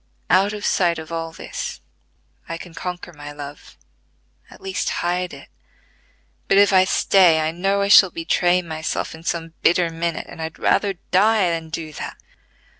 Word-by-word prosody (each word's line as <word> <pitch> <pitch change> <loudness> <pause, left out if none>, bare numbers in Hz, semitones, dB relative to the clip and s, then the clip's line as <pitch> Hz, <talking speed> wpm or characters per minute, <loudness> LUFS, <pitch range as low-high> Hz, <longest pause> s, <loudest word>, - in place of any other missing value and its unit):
Out 190 +3 +4
of 210 -1 -5
sight 175 -3 +2
of 160 0 -8
all 165 0 -4
this, 165 - -6 0.7
I 165 - -3
can 170 0 -11
conquer 180 0 -6
my 145 -1 -9
love, 145 0 -10 0.7
at - - -15
least 190 -1 -3 0.2
hide 180 +1 -1
it; 140 -1 -12 1.0
but 195 - +3
if 200 0 +5
I 185 0 +6
stay 180 -4 +4
I 155 0 0
know 195 +4 0
I - - 0
shall 200 -1 +8
betray 175 +2 +1
myself 160 -1 -4
in 160 - -11
some 165 -1 -3
bitter 170 -1 +3
minute, 165 0 -3
and - - -10
I'd 160 0 -5
rather 200 -2 +1 0.2
die 200 -1 +4
than 165 -1 -4
do 160 -1 -6
that." - - -7
170 Hz, 170 wpm, -21 LUFS, 160-185 Hz, 1.0 s, shall